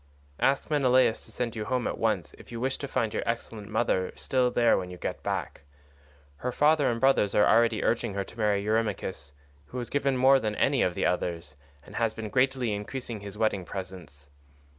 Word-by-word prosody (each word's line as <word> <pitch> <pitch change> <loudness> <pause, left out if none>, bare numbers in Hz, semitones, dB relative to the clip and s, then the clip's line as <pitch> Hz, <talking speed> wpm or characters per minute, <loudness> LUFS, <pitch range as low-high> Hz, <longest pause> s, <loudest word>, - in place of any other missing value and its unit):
Ask 140 +3 +1
Menelaus 130 -5 +3
to - - -16
send 120 -2 -3
you 110 -1 -3
home 125 +1 -1
at - - -3
once 105 -7 0
if - - -14
you 115 - -5
wish 130 +2 -1
to 140 - -4
find 115 -5 -1
your - - -1
excellent 115 -2 -4
mother 105 -4 0
still 125 -1 +1
there 120 -1 +3
when 90 -1 -3
you 90 - -8
get - - -4
back. - - -3 0.8
Her 125 - -3
father 150 +2 +3
and 115 -1 -1
brothers 130 -6 +3
are 105 - +5
already 115 -1 +3
urging 115 -4 0
her 100 - -1
to - - -14
marry 105 -2 +2
Eurymachus, 105 -9 -2 0.4
who 125 - -8
has 120 -1 -5
given 140 -1 +1
her - - -2
more 135 +1 +6
than 110 -3 -2
any 135 +3 +2
of 90 - +1
the - - 0
others, 85 -2 -2 0.3
and - - -10
has 115 -2 0
been 110 -1 -5
greatly 130 -2 +1
increasing 115 +2 -5
his 100 0 -9
wedding 110 -4 +1
presents. 85 -7 -9
115 Hz, 205 wpm, -28 LUFS, 100-125 Hz, 0.8 s, more